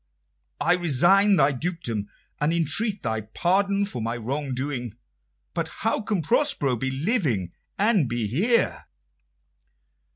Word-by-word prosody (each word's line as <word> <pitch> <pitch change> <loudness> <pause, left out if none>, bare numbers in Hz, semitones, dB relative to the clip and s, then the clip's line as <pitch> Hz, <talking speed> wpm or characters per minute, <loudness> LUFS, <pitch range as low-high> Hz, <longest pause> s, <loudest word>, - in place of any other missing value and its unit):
I 170 +4 +3
resign 180 +5 +4
thy 150 -4 +4
dukedom, 125 - -4 0.3
and 150 +2 +1
entreat 175 +6 0
thy 110 -1 -1
pardon 195 - 0
for 125 - -5
my 115 +2 -2
wrong 135 +3 -3
doing. 125 -4 -3 0.6
But 165 -1 -2
how 220 +7 -2
can 205 -5 -2
Prospero 195 - +1
be 130 +3 -2
living 135 - 0 0.3
and 200 - +2
be 120 -2 -1
here?" 190 - +1
155 Hz, 125 wpm, -25 LUFS, 125-195 Hz, 0.6 s, resign